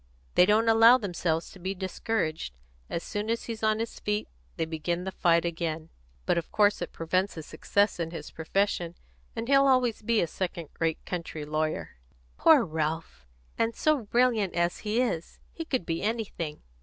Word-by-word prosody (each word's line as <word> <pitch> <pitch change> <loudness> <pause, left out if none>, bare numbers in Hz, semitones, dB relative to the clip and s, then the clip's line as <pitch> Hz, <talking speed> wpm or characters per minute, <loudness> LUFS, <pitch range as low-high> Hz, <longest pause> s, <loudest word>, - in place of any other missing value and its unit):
"They 180 - +6
don't 220 +2 +4
allow 225 +2 +8
themselves 175 -6 -2
to 190 - -13
be 190 +2 -3
discouraged. 185 - -2 0.3
As 170 - -3
soon 210 +1 -3
as 230 0 0
he's 225 -2 -6
on 215 -1 +2
his 225 +1 -4
feet 210 0 -1 0.3
they 165 - 0
begin 170 +2 -2
the 190 - -3
fight 170 -2 +3
again. 165 -1 -3 0.4
But 170 - +2
of 165 - -9
course 205 -1 +3
it - - -4
prevents 185 +4 -1
his 160 -2 -7
success 200 +6 0
in 165 -1 -1
his 165 - -8
profession, 175 0 -1 0.4
and 230 0 -4
he'll 275 0 +5
always 250 -4 +3
be 225 +1 +2
a - - +3
second 170 -1 -4
rate 165 -1 -1
country 165 -4 -5
lawyer." 155 - -2 0.4
"Poor 315 -6 +6
Ralph! 155 - -3 0.3
And 230 0 +1
so 310 -2 +2
brilliant 230 -4 +2
as 170 0 +1
he 215 +2 -1
is! 200 -10 -1
He 330 - -6
could 255 - -1
be 165 0 -2
anything." 205 -8 -3
185 Hz, 180 wpm, -28 LUFS, 165-225 Hz, 0.4 s, allow